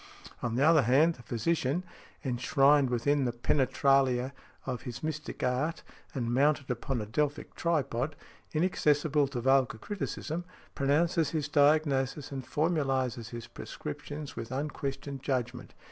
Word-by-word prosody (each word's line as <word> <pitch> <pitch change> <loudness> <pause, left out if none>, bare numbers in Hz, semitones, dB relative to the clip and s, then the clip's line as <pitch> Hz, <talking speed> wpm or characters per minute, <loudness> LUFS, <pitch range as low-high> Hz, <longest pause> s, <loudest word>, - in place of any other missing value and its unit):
On 115 -1 -1
the 130 - +2
other 160 -2 +6
hand, 140 +7 +4
the 125 - -14
physician, 135 +7 0 0.4
enshrined 135 +2 +3
within 135 +3 +1
the 120 - +1
penetralia 130 +1 +2 0.3
of 125 -3 -3
his 125 +1 -7
mystic 155 -1 -4
art, 130 +6 0 0.3
and 120 -3 -1
mounted 140 0 +2
upon 125 0 -2
a - - -4
Delphic 145 +6 -2
tripod, 145 -4 -1 0.4
inaccessible 150 -3 +2
to 130 -3 -4
vulgar 135 -2 +3
criticism, 175 - -4 0.3
pronounces 155 +3 +2
his 155 -1 -1
diagnosis 145 -2 +2
and 135 -1 -4
formulizes 135 -7 0
his 120 -1 -7
prescriptions 145 - -7
with 115 - -5
unquestioned 140 0 -4
judgment. 125 -2 -3
140 Hz, 130 wpm, -30 LUFS, 125-150 Hz, 0.4 s, other